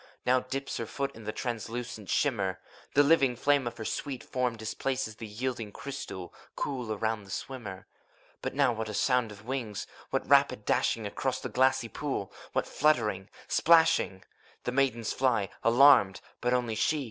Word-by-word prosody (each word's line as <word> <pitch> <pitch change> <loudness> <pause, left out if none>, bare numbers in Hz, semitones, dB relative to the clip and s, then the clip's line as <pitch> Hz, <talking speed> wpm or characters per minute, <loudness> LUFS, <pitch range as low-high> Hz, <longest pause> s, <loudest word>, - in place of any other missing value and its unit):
Now 130 +1 +4
dips 135 +2 -4
her 115 - -4
foot 140 +3 -3
in 110 -1 -11
the 110 - -2
translucent 115 -2 -5
shimmer: 100 -10 +1 0.4
The 145 - +7
living 140 -4 +4
flame 140 -1 +2
of 120 - -5
her 110 - -6
sweet 135 +2 -3
form 125 -2 -1
displaces 110 +1 -3
The 115 - -7
yielding 115 0 -4
crystal, 100 -8 -7 0.2
cool 125 -5 -3
around 110 0 -1
the - - -16
swimmer. 100 -4 -6 0.6
But - - -4
what 120 -6 +1
a 105 - -4
sound 125 -3 +2
of 105 +1 -12
wings! 120 -6 -3 0.2
What - - -1
rapid - - +4
dashing 110 - +1
Across 130 +6 -2
the - - -4
glassy 130 -1 +2
pool, 135 -6 -4 0.2
what - - 0
fluttering, 110 -10 +1 0.2
splashing! 165 - +4 0.4
The - - -1
maidens 125 -4 +1
fly, 120 -7 +1
alarmed; 115 -6 +6 0.2
but 125 - +1
only 125 -3 +1
she. 130 +8 +1
120 Hz, 160 wpm, -29 LUFS, 110-135 Hz, 0.6 s, The